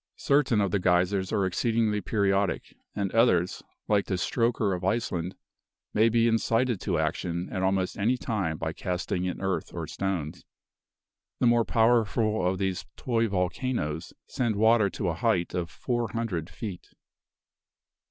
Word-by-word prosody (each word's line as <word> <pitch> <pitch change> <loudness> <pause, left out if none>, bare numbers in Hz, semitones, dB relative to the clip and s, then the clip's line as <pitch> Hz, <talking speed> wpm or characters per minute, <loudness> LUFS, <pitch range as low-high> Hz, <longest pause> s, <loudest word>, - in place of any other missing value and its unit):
Certain 140 -6 +2
of 100 -3 0
the 100 - +1
geysers 90 +1 +2
are 100 - +1
exceedingly 110 +3 +1
periodic; 100 0 0 0.2
and 100 -2 -1
others, 90 -7 +3 0.3
like 105 -2 +2
the 95 - 0
Strokr 110 +1 +1
of 90 - -7
Iceland, 95 -3 -1 0.6
may 110 +2 +4
be 115 0 +3
incited 115 -1 +1
to 90 -5 0
action 85 +3 -2
at 95 - -2
almost 95 -1 0
any 120 +6 +2
time 100 -11 -2
by 80 0 -3
casting 90 +1 -2
in 90 - -3
earth 95 -1 -2
or - - -3
stones. 90 -5 -3 1.0
The - - +2
more 120 -1 +4
powerful 110 -3 +2
of 95 +1 0
these 95 -1 -2
"toy 115 -2 +1
volcanoes" 90 - -2
send 120 -4 -1
water 110 0 +4
to 95 -1 -2
a - - 0
height 90 -2 0
of 85 -2 -2
four 120 +8 -2
hundred 100 -8 -3
feet. 100 -8 -7
100 Hz, 150 wpm, -27 LUFS, 90-115 Hz, 1.0 s, may